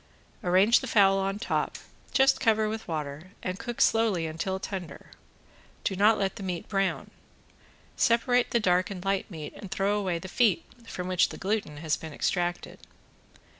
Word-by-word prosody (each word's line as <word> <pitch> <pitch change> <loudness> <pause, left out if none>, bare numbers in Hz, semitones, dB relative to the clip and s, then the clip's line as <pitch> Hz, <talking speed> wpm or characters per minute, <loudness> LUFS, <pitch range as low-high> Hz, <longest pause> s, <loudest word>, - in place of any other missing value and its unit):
Arrange 190 +6 +5
the 265 - -6
fowl 195 -3 +4
on 195 +1 -1
top, 215 - -2 0.3
just 270 0 +4
cover 220 -1 +3
with 220 +1 -5
water, 155 +2 -5
and 185 +1 -3
cook 240 -2 -5
slowly 220 -7 +3
until 165 +4 -3
tender. 190 -3 -7 0.7
Do 195 - -1
not 210 +3 +4
let 195 +1 -1
the - - -7
meat 180 -3 -4
brown. 195 -2 -1 0.8
Separate 245 +1 +3
the 235 - +2
dark 180 -3 +2
and 190 -2 -7
light 195 +1 0
meat 155 -5 -7
and 195 - -9
throw 200 +2 0
away 185 -4 -1
the 170 - -8
feet, 240 - +2 0.2
from 180 -4 -5
which 185 -1 +3
the - - -8
gluten 195 -7 -2
has 155 0 -1
been 160 -2 -8
extracted. 175 +2 -2
195 Hz, 170 wpm, -28 LUFS, 180-215 Hz, 0.8 s, Arrange